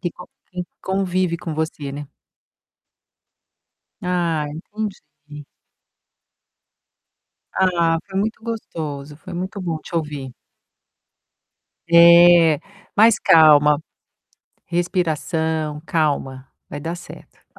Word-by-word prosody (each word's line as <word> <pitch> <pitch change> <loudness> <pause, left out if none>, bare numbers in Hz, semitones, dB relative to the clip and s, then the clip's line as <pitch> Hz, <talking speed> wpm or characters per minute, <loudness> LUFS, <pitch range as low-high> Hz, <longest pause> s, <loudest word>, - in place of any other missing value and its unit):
que 175 - -2
con 180 - -12 0.3
quem 180 -1 -5 0.2
convive 185 -2 -1
com 165 -2 -6
você, 155 -3 -4
né? 145 0 -7 1.9
Ah, 170 -4 -1
entendi. 155 -5 -8 2.1
Ah, 170 -3 +2
foi 190 -1 -4
muito 220 +2 -2
gostoso, 150 -10 -6
foi 180 +3 -11
muito 190 +3 -5
bom 165 -3 -3
te 170 - -12
ouvir. 145 -5 -4 1.6
É, 170 -2 +7 0.4
mas, 220 +1 +5
calma, 150 -2 +6 0.9
respiração, 160 -3 -1
calma, 140 -5 -1 0.2
vai 145 - -6
dar 165 +3 -4
certo. 175 - -14
165 Hz, 90 wpm, -21 LUFS, 150-180 Hz, 2.1 s, É